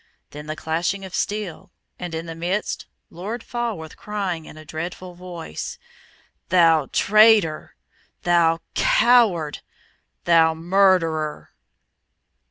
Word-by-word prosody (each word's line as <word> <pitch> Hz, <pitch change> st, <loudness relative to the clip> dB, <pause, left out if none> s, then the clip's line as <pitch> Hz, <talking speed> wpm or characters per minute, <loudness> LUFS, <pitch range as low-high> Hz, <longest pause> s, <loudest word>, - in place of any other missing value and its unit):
Then 150 Hz, +1 st, -9 dB
the 155 Hz, -, -4 dB
clashing 170 Hz, +5 st, -2 dB
of 190 Hz, -, -11 dB
steel, 205 Hz, -5 st, -3 dB, 0.3 s
and 175 Hz, -2 st, -5 dB
in 165 Hz, +1 st, -4 dB
the 165 Hz, -, -6 dB
midst 175 Hz, +5 st, -3 dB, 0.2 s
Lord 210 Hz, +7 st, -6 dB
Falworth 230 Hz, -10 st, -4 dB
crying, 195 Hz, -6 st, -4 dB
in -, -, -12 dB
a 155 Hz, -, -12 dB
dreadful 175 Hz, +4 st, -6 dB
voice, 175 Hz, -, -7 dB, 0.7 s
"Thou 165 Hz, -5 st, +4 dB
traitor! 210 Hz, -7 st, +4 dB, 0.5 s
thou 170 Hz, -1 st, +3 dB
coward! 235 Hz, -, +3 dB, 0.6 s
thou 165 Hz, -1 st, +4 dB
murderer!" 165 Hz, -3 st, +1 dB
175 Hz, 105 wpm, -22 LUFS, 160-200 Hz, 0.7 s, Thou